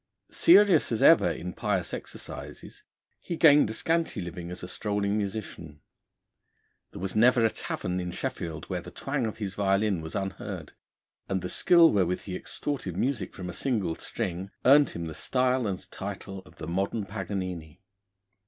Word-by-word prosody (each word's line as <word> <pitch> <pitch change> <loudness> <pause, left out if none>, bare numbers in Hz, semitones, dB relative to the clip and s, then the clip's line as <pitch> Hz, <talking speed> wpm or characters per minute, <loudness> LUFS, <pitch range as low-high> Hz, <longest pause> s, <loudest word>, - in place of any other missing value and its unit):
Serious 205 - +5
as 115 - 0
ever - - +7
in 90 +1 -5
pious 95 -3 -1
exercises, - - -8 0.4
he 170 - -5
gained 150 -8 +6
a - - -3
scanty 165 +4 0
living 85 -1 -6
as 90 0 -6
strolling 100 -1 -1
musician. 100 -7 -5 1.1
There - - -10
was 95 0 -3
never 120 +1 +5
a 110 - +3
tavern 90 0 -3
in 90 0 -3
Sheffield 85 -2 -4
where - - -3
the - - -10
twang 135 -4 -2
of 110 - -6
his 100 -4 -4
violin 100 -1 +1
was 80 0 -7
unheard, 95 -1 -5 0.6
and 95 -2 -1
the 90 - -3
skill 170 -2 +5
wherewith 90 -3 +1
he 95 - -6
extorted 100 - -4
music 135 +4 -1
from 90 - -6
a 90 - -5
single 105 -5 -1
string 95 0 -4 0.2
earned 140 +1 +7
him 85 - -5
the 80 - -6
style 125 - +1
and 95 -2 -5
title 95 0 -6
of 75 - -17
the - - -7
modern 100 +5 -1
Paganini. 95 -6 -5
100 Hz, 160 wpm, -28 LUFS, 90-120 Hz, 1.1 s, ever